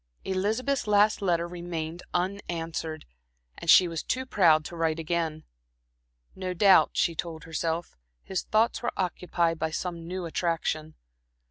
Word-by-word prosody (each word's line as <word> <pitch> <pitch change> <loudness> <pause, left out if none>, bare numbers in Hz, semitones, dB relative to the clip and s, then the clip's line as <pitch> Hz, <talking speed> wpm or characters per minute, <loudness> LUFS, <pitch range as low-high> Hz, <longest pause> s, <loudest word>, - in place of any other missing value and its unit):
Elizabeth's 220 +8 0
last 210 +1 +4
letter 170 -3 +1
remained 170 -1 -5
unanswered, 165 -4 -3 0.5
and 170 - -5
she 180 - +8
was 165 -3 -3
too 260 +1 -2
proud 160 -10 +4
to 170 - -7
write 165 -1 0
again. 165 -1 -2 0.9
No 185 -1 -4
doubt, 195 +1 +6
she 170 - +2
told 160 -1 -5
herself, 165 +1 -3 0.3
his 190 - -2
thoughts 225 +2 +1
were 240 - -1
occupied 175 -2 0
by 160 - 0
some 165 +1 -4
new 185 0 -4
attraction. 160 -2 -2
170 Hz, 135 wpm, -27 LUFS, 165-190 Hz, 0.9 s, she